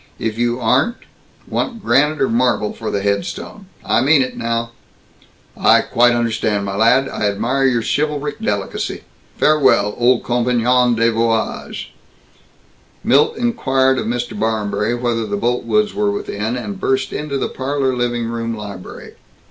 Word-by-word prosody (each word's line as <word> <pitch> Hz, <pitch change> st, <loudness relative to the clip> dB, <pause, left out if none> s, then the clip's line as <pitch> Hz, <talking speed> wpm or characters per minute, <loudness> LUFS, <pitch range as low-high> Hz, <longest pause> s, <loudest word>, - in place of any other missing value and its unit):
If 110 Hz, -1 st, -3 dB
you 120 Hz, +1 st, 0 dB
aren't 130 Hz, -, +2 dB, 0.5 s
Want 230 Hz, -3 st, -3 dB
granite 145 Hz, +6 st, +2 dB
or -, -, +2 dB
marble 120 Hz, -2 st, +1 dB
for 110 Hz, -, -5 dB
the 100 Hz, -, -2 dB
headstone? 100 Hz, -, -3 dB, 0.2 s
I 110 Hz, -, +2 dB
mean 140 Hz, +1 st, +4 dB
it, 130 Hz, -, -6 dB
now!" 115 Hz, 0 st, -2 dB, 0.8 s
"I -, -, +4 dB
quite 120 Hz, 0 st, +3 dB
understand, 110 Hz, -3 st, 0 dB
my 100 Hz, -1 st, -4 dB
lad. 120 Hz, +6 st, +4 dB
I 105 Hz, -, -2 dB
admire 120 Hz, +7 st, 0 dB
your 120 Hz, -4 st, +2 dB
chivalric 150 Hz, +1 st, -1 dB
delicacy. 100 Hz, -2 st, -3 dB, 0.3 s
Farewell, 135 Hz, -9 st, +3 dB
old 120 Hz, 0 st, +3 dB
compagnon 125 Hz, 0 st, +2 dB
de 115 Hz, +1 st, +2 dB
voyage!" 115 Hz, 0 st, -2 dB, 1.1 s
Milt 145 Hz, +3 st, +3 dB
inquired 135 Hz, -, +1 dB
of -, -, -3 dB
Mr. 120 Hz, +1 st, -2 dB
Barmberry 110 Hz, 0 st, -1 dB
whether 120 Hz, -2 st, -1 dB
the 100 Hz, 0 st, -2 dB
Boltwoods 125 Hz, -, 0 dB
were 205 Hz, +1 st, 0 dB
within, 115 Hz, -, -3 dB
and 105 Hz, -5 st, -6 dB
burst 130 Hz, 0 st, 0 dB
into 150 Hz, -2 st, -3 dB
the -, -, -1 dB
parlor 135 Hz, -1 st, -1 dB
living 120 Hz, -1 st, -1 dB
room 115 Hz, 0 st, -3 dB
library. 100 Hz, -3 st, -9 dB
120 Hz, 145 wpm, -18 LUFS, 110-135 Hz, 1.1 s, mean